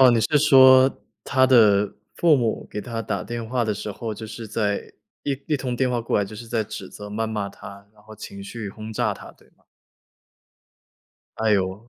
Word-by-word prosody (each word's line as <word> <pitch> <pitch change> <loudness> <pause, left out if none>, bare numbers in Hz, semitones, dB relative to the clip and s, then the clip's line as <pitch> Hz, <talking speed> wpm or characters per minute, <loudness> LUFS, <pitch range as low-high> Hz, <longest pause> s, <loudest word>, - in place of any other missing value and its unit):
哦， 130 -1 +8
你 115 -2 +3
是 145 +7 +2
说 130 -2 +6 0.2
他 130 -1 +3
的 105 -5 +5 0.2
父 165 -4 +5
母 115 -3 -1
给 105 - -4
他 115 -1 -5
打 - - -3
电 120 -1 -5
话 120 0 0
的 105 -1 -1
时 105 +1 -5
候， 110 +1 -5
就 110 - -8
是 115 +1 -8
在 105 -2 -2 0.3
一 145 - 0
一 150 - +1
通 125 -2 -3
电 130 0 +1
话 120 - 0
过 115 - 0
来 100 - +1
就 105 - -10
是 115 - -9
在 115 -1 -1
指 100 -2 -8
责 105 0 -10
谩 110 +2 -2
骂 105 -2 -3
他， 100 0 -12
然 105 -1 -23
后 110 0 -13
情 100 -1 -9
绪 105 +1 -6
轰 110 +2 -8
炸 - - 0
他， - - -12
对 - - -25
吗？ - - -34 1.7
哎 110 -1 +1
呦， 95 +3 -1
110 Hz, 225 characters per minute, -23 LUFS, 105-125 Hz, 1.7 s, 哦